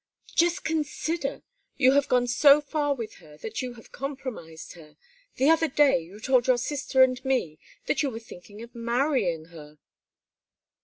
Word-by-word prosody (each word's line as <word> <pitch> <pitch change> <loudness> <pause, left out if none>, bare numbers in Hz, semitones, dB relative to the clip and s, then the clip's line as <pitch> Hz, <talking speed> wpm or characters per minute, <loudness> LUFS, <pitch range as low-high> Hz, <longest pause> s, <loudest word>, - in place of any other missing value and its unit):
"Just 345 0 +2
consider! 320 -1 -2 0.3
You 260 -2 +5
have 280 0 +2
gone 250 -1 +2
so 280 +4 +6
far 290 -1 -1
with 230 -4 -7
her 150 -1 -16
that 220 +7 -5
you 250 -1 -5
have 225 - -16
compromised 255 - -7
her. 160 -3 -16 0.4
The 265 - +2
other 325 0 +3
day 285 - +3
you 175 +5 -12
told 255 +2 +2
your 255 -1 +4
sister 265 0 +2
and 255 0 0
me 245 - -1 0.3
that - - 0
you 285 - 0
were 225 - -7
thinking 210 0 -12
of 235 - -13
marrying 235 - -1
her." 150 -2 -13
255 Hz, 165 wpm, -26 LUFS, 215-285 Hz, 0.4 s, so